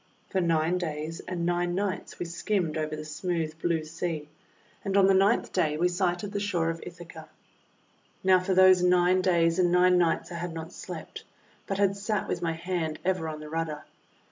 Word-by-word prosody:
For 190 - +1
nine 165 +1 +1
days 160 -1 -4
and 175 -2 -2
nine 175 0 0
nights 200 0 -3
we 175 - -3
skimmed 170 -1 -1
over 155 -1 -2
the 155 0 -7
smooth 160 0 -2
blue 170 -2 0
sea, 155 -1 -4 0.5
and 195 -1 0
on 195 - +6
the 195 - +5
ninth 195 +4 +3
day 155 -5 +1
we 175 +3 +2
sighted 180 +2 -1
the 205 - -2
shore 175 -5 0
of 165 - -7
Ithaca. 170 -2 -10 0.9
Now 185 -1 +5
for 185 +1 -1
those 185 -1 +7
nine 180 +1 +4
days 170 -2 +2
and 175 -1 +3
nine 180 0 +5
nights 170 +1 +1
I 170 - -5
had 175 -1 -4
not 165 0 -7
slept, - - -8 0.4
but 195 - -2
had 200 -1 +2
sat 205 +1 -2
with 175 - -2
my 165 -1 0
hand 165 -2 -3
ever 185 -3 0
on 155 -1 -6
the 155 - -8
rudder. 160 -2 -3
175 Hz, 195 wpm, -28 LUFS, 165-185 Hz, 0.9 s, those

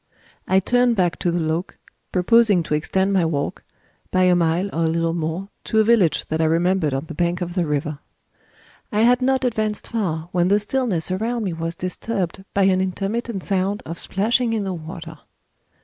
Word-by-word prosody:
I 190 - +4
turned 245 +4 +2
back 180 -4 +1
to 175 - 0
The 170 - 0
Loke, 160 +2 -2 0.3
proposing 205 0 +4
to 155 - -3
extend 190 +6 +1
my 190 -3 +3
walk, 150 -3 -2 0.5
by 185 - +2
a 180 0 +5
mile 170 +1 +1
or 165 +1 +1
a - - +2
little 165 0 0
more, 170 +4 -3 0.2
to 220 - +1
a - - +6
village 215 -7 +3
that 160 +1 0
I - - +3
remembered 170 0 +2
on 135 +3 -2
the 160 - -8
bank 175 +2 0
of 175 -1 -4
the 175 -3 0
river. 150 0 -2 0.9
I 210 0 +1
had 245 +2 +4
not 265 +1 +2
advanced 215 -3 -1
far, 170 -8 -2
when 175 -1 +2
the 200 +2 +4
stillness 210 -6 -1
around 225 +5 -1
me 185 -4 -2
was 165 +1 -4
disturbed 185 +1 -3
by 200 - +2
an 190 -1 +3
intermittent 195 +2 -2
sound 195 +1 -1
of 165 +1 -6
splashing 230 +4 +1
in 215 -2 0
the 190 -1 -3
water. 165 -1 -8
185 Hz, 195 wpm, -22 LUFS, 165-210 Hz, 0.9 s, a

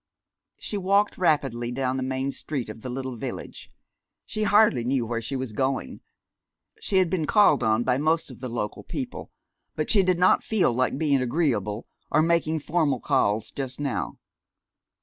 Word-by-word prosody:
She 205 - -4
walked 200 +2 +1
rapidly 135 -9 +1
down 130 +1 -1
the - - -2
main 130 +1 -2
street 135 -5 -4
of 110 +1 -9
the 130 - -6
little 130 -1 -4
village. - - -7 0.6
She 215 - -4
hardly 205 - +4
knew 125 0 0
where 115 0 -2
she 115 +4 -4
was 130 -4 -4
going. 130 - -2 0.8
She 195 - 0
had 185 -1 +4
been 165 -3 -1
called 210 -1 +5
on 110 +1 +2
by 125 +1 +1
most 160 0 +1
of 125 - -12
the 130 0 -5
local 110 -3 -4
people, 255 -2 -6 0.4
but - - 0
she 205 - +6
did 185 -1 +2
not 180 +1 +4
feel 200 - +2
like 130 +2 0
being 140 -3 +2
agreeable, 120 - 0 0.2
or 155 - +3
making 160 -2 +1
formal 150 -4 +1
calls, 105 0 +1
just 130 -1 -5
now. 140 -7 -3
135 Hz, 170 wpm, -25 LUFS, 120-170 Hz, 0.8 s, she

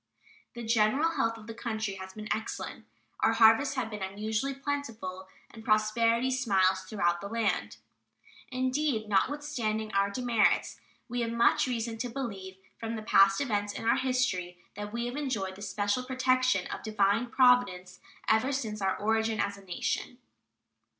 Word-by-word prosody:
The 240 - -6
general 230 +8 +2
health 230 -7 0
of 220 - -12
the 225 - -7
country 220 -3 -3
has 190 0 -9
been 215 +1 -8
excellent, 220 +1 -5 0.3
our - - +3
harvests 235 +5 +5
have 240 -4 -2
been 210 -1 -6
unusually 215 +7 -2
plentiful, 230 -10 -4 0.2
and 225 - -12
prosperity 230 +3 +2
smiles 190 -7 +2
throughout 180 -3 -1
the 200 - -5
land. 225 -1 -1 0.7
Indeed, 255 -2 0
notwithstanding 220 -3 -1
our 200 0 +2
demerits, 235 0 +1 0.3
we 245 0 -2
have 230 - -1
much 235 +3 +3
reason 230 -2 -3
to 245 +1 -2
believe 200 -7 -6 0.2
from 225 0 -4
the 220 - -6
past 195 -1 +5
events 205 -6 -1
in - - -6
our 230 - +4
history 250 -9 0 0.2
that 205 +1 -6
we 235 +1 -2
have 245 +1 -4
enjoyed 215 -10 -2
the 200 - -12
special 205 +3 -1
protection 255 -5 +1
of - - -5
Divine 215 +2 +1
Providence 240 -8 +3 0.3
ever 220 +5 +3
since 220 -6 -3
our 190 -1 0
origin 220 0 0
as 200 0 0
a 200 - -15
nation. 190 +6 -3
220 Hz, 155 wpm, -29 LUFS, 200-250 Hz, 0.7 s, harvests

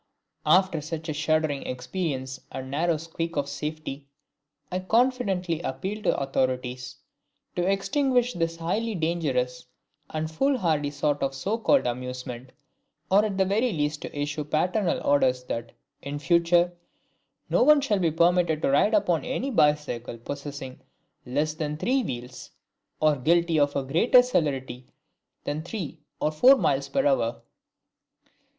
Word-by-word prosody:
After 185 -4 +4
such 160 +2 -6
a - - -1
shuddering 155 -1 0
experience 130 0 -3
and 130 0 -6
narrow 165 +3 +1
squeak 165 +1 -5
of 145 - +1
my - - -9
safety, 150 -1 -5 0.6
I 185 - -1
confidently 190 -6 +1
appeal 190 +8 -3
to 215 - -1
the - - +2
authorities 130 -2 -2 0.6
to 175 0 0
extinguish 250 +4 +1
this 165 -1 -1
highly 210 +7 -1
dangerous 145 -7 -1 0.4
and 155 0 -3
foolhardy 165 - +1
sort 145 0 -1
of 135 0 -1
so 205 +11 -2
called 275 +4 +3
amusement, 125 0 -5 0.6
or 200 +2 +6
at 205 -3 -2
the 190 - +3
very 220 +6 +1
least 150 -3 -1
to 145 - -6
issue 150 +1 -2
paternal 180 +6 0
orders 130 -3 +3
that, 115 -2 -5 0.3
in 140 +1 -5
future, 170 +3 +3 0.7
no - - +2
one 300 +3 +7
shall 220 -8 0
be 170 -3 +2
permitted 170 -1 +2
to - - +2
ride 205 +10 +4
upon 180 -6 +2
any 265 +1 -2
bicycle 150 - +1
possessing 140 +1 -7 0.5
less 150 +5 0
than 150 -1 -3
three 260 - +1
wheels, 125 - -6 0.5
or 155 -1 +3
guilty 170 +4 +2
of 145 0 +2
a 140 - 0
greater 175 - +5
celerity 135 - -2 0.6
than 150 +2 -3
three 170 -3 -6 0.2
(or 155 - +1
four) 250 - +7
miles 140 - 0
per 275 0 +1
hour. 275 -2 +1
155 Hz, 145 wpm, -26 LUFS, 140-190 Hz, 0.7 s, one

